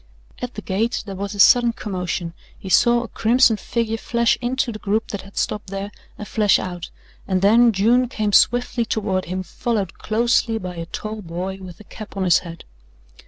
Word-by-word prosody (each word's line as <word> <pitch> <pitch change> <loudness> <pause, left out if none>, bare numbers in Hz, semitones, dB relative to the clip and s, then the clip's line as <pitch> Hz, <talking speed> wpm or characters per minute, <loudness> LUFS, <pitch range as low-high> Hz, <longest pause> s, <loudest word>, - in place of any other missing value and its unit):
At 250 0 -6
the 210 - -7
gate 220 +5 -1
there 200 - -6
was 200 +2 -5
a - - -9
sudden 240 +3 +6
commotion, 180 -5 -4 0.2
he 190 - -9
saw 240 +4 +4
a - - -7
crimson 230 0 +3
figure 225 0 -2
flash 235 +1 +1
into 255 +1 -1
the 215 - -8
group 215 +3 -1
that 200 - -4
had 195 +1 -15
stopped 210 -1 -2
there, 195 +1 -5 0.3
and 210 - -7
flash 210 -3 +3
out, 175 -2 -6 0.4
and 185 -1 0
then 230 +4 +6
June 235 +5 +3
came 215 -4 -2
swiftly 245 +1 +3
toward 200 -4 -1
him 185 +1 -4
followed 205 -2 -3
closely 230 +1 +1
by 180 -4 -6
a 165 0 -5
tall 215 +4 -6
boy 185 +2 -5
with 180 -2 -10
a - - -12
cap 210 0 -11
on 195 - 0
his 180 -2 +4
head. 170 -2 -10
210 Hz, 195 wpm, -21 LUFS, 190-235 Hz, 0.4 s, sudden